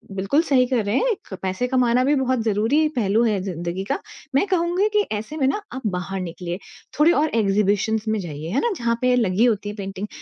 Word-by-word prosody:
बिल्कुल 195 +11 +2
सही 265 -6 +3
कह 245 -2 +1
रहे 205 +4 0
हैं, 415 - -1
पैसे 190 +6 -1
कमाना 250 -1 +2
भी 285 - +3
बहुत 260 -3 +1
ज़रूरी 225 +9 +2
पहलू 220 -1 +2
है 210 -3 +1
ज़िन्दगी 175 0 -4
का, - - -1 0.4
मैं 275 - +4
कहूँगी 360 +2 +1
कि 420 - +4 0.2
ऐसे 220 +9 -7
में 275 - +1
ना 415 +10 0
आप 260 - -5
बाहर 190 +2 -4
निकलिए, 175 +1 -5 0.4
थोडे 310 +3 +6
और 310 -2 +2
एक्ज़िबिशन्स 210 +1 +1
में 220 0 +1
जाइए, 155 -2 -6
है 250 - +1
ना 475 - +1
जहाँ 235 -2 0
पे 250 0 +3
लगी 220 -2 +2
होती 210 -4 0
है 205 - -6
पेंटिंग 195 0 -5
220 Hz, 210 wpm, -22 LUFS, 195-265 Hz, 0.4 s, थोडे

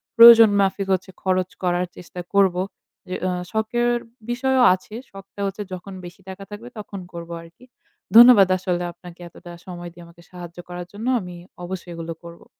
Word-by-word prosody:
প্রয়োজন 230 -2 +10
মাফিক 195 0 0
হচ্ছে 185 0 -3
খরচ 185 -1 0
করার 180 0 +1
চেষ্টা 180 0 -9
করবো। 190 -2 +3 0.7
আ - - 0 0.2
শখের 240 +2 0 0.3
বিষয়ও 260 +1 +2
আছে। 200 +3 -7 0.2
শখটা 195 +1 -11
হচ্ছে 195 +2 -5
যখন 185 +2 -8
বেশি 175 +3 -12
টাকা 190 +1 -8
থাকবে 215 +4 -9
তখন 205 -2 -8
করবো 170 0 -7
আরকি। 165 +9 -17 0.5
ধন্যবাদ 235 -4 +9
আসলে 180 -1 -2
আপনাকে 175 0 -14
এতটা 175 +1 -13
সময় 175 -2 -8
দিয়ে 175 0 -13
আমাকে 170 0 -18
সাহায্য 175 -1 -10
করার 175 0 -6
জন্য। 215 +4 -6
আমি 180 -3 -8 0.3
অবশ্যই 180 0 -7
এগুলো 165 0 -6
করবো। 170 0 -12
185 Hz, 160 wpm, -22 LUFS, 175-210 Hz, 0.7 s, প্রয়োজন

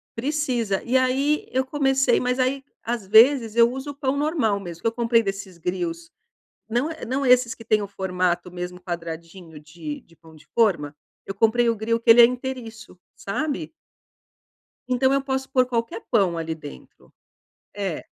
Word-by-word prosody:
precisa. 245 -6 -1
E 250 +2 -1
aí 265 +4 +2
eu 260 +1 0
comecei, 270 -1 +2
mas 250 +1 -1
aí, 265 +2 0 0.2
às 230 -3 -3
vezes, 225 +2 +5
eu 235 0 +6
uso 265 +2 -6
o 285 - -13
pão 270 -1 -1
normal 285 -9 0
mesmo, 175 -3 -9
que - - 0
eu - - +2
comprei 230 0 +2
desses 195 -3 -5
grills 170 -1 -4 0.6
não, 240 +7 0 0.2
não 270 +3 -1
é 250 - +5
esses 250 0 +4
que 225 - -14
têm 215 -1 +2
o 200 - -4
formato 180 -2 -2
mesmo 180 0 -6
quadradinho 170 -1 -7
de 155 0 -8
de 165 - -24
pão 160 -1 -18
de 150 - -19
forma. 170 -11 +2 0.3
Eu 195 - -5
comprei 230 +2 +3
o 230 - +1
grill 230 +2 -1
que 230 - -3
ele 235 +1 +10
é - - +10
inteiriço, 240 -5 -6 0.2
sabe? 290 +8 -3 1.2
Então 260 +1 +2
eu 275 0 +2
posso 265 -1 -3
pôr 255 -1 +2
qualquer 230 -2 -3
pão 195 -8 +2
ali 165 0 -3
dentro. 65 - -13 0.6
É, 195 -6 -4
230 Hz, 175 wpm, -23 LUFS, 180-260 Hz, 1.2 s, ele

